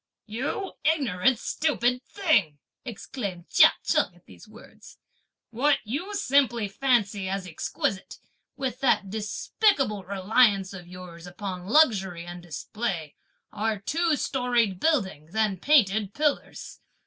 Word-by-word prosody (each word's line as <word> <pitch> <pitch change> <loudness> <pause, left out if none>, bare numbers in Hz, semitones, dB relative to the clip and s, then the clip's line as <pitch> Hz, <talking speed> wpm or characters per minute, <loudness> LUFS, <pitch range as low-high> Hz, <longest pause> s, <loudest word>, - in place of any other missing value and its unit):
'" - - -64
"You 260 - -4
ignorant 265 - +2
stupid 250 -2 0
thing!" 265 - +1 0.3
exclaimed 200 -6 -6
Chia - - +7
Cheng - - +1
at - - -24
these - - -15
words; - - -16 0.5
"what 275 +5 +2
you 320 - -4
simply 255 - +2
fancy 205 -4 0
as 195 -1 -3
exquisite, 190 +2 -3 0.4
with 260 -2 -3
that 205 -7 +1
despicable 220 - 0
reliance 200 +1 +2
of 180 -2 -10
yours 180 -1 -11
upon 180 0 -6
luxury 195 - +3
and 175 0 -8
display, 175 -1 -4 0.4
are 215 +1 -1
two 320 - 0
storied 240 -9 0
buildings 190 - -1
and 210 -4 0
painted 215 -8 +3
pillars! 295 -1 -2
215 Hz, 120 wpm, -26 LUFS, 190-265 Hz, 0.5 s, Chia